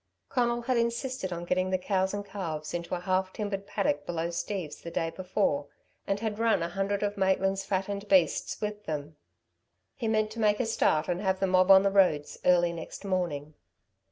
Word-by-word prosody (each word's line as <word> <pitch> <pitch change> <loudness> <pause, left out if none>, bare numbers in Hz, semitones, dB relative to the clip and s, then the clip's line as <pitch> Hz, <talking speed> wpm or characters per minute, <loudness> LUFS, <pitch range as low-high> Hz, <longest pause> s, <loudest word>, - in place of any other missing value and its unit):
Conal 240 -1 +1
had 255 0 +1
insisted 235 -3 -1
on 170 0 -4
getting 185 +1 +1
the 185 - +2
cows 190 0 0
and 205 0 -4
calves 165 -7 -5
into 175 +1 -3
a - - -4
half 185 +1 0
timbered 200 -1 -4
paddock 145 -9 0
below 170 +1 -2
Steve's, 170 -3 -4
the 170 - -6
day 165 -1 -1
before, 180 -6 -1 0.4
and 195 0 0
had 220 -1 -2
run 225 -6 +3
a 170 - -2
hundred 195 +2 -1
of 205 0 -1
Maitland's 195 0 +1
fattened 200 +1 -2
beasts 185 -5 +2
with 210 0 -4
them. 150 0 -4 0.8
He 240 -5 -4
meant 215 -1 +1
to 230 - -7
make 210 -1 +3
a 250 - +1
start 160 -8 +2
and 180 +1 -1
have 190 -2 0
the 195 - +2
mob 185 0 +3
on 195 0 +9
the 200 - +2
roads 180 -7 +2
early 175 -1 +4
next 170 +4 -8
morning. 165 -6 -2
190 Hz, 195 wpm, -29 LUFS, 175-205 Hz, 0.8 s, on